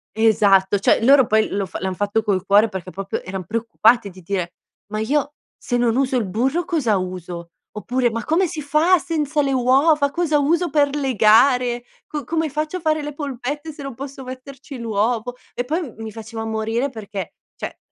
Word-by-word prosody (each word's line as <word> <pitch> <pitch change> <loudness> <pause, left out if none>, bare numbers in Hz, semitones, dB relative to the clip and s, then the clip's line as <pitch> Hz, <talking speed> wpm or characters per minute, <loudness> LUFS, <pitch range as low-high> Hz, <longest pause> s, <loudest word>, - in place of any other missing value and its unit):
Esatto. 205 -3 +4
Cioè 210 - +3
loro 265 0 +6
poi 220 0 +3
lo 200 0 -1
fa 185 - -7
l'han 190 0 -1
fatto 205 +3 0
col 190 -4 0
cuore, 210 +3 +5
perché 190 -2 -6
proprio 195 +1 -4
eran 185 -1 -6
preoccupati 230 0 +2
di 185 0 -14
dire: 180 -1 -3 0.4
"Ma 215 - -2
io 285 +5 0 0.2
se 245 - -2
non 240 -2 +2
uso 265 0 +1
il 230 - 0
burro, 260 - 0
cosa 245 - +1
uso?" 180 -2 -6 0.2
oppure: 245 +4 0
"Ma 230 +1 -4
come 350 +4 +2
si 305 -1 -5
fa 310 +6 +3
senza 305 -2 -1
le 275 -1 0
uova? 280 +4 +3
Cosa 315 -2 +1
uso 335 +5 +1
per 285 -1 +2
legare? 245 -1 +3 0.2
Co 295 -3 -5
come 320 +3 -1
faccio 305 +5 -2
a - - -6
fare 310 -2 0
le 295 0 -5
polpette, 285 +2 -5
se 290 -1 -10
non 275 -2 -6
posso 270 +1 -8
metterci 265 +2 -9
l'uovo?" 230 +2 -1 0.2
E, 245 - -2
poi, 315 +8 -1
m 260 -10 -7
mi 220 -1 -6
faceva 225 +1 -7
morire 225 +4 -1
perché, 205 -7 -7 0.2
cioè - - -6
245 Hz, 190 wpm, -21 LUFS, 215-290 Hz, 0.4 s, loro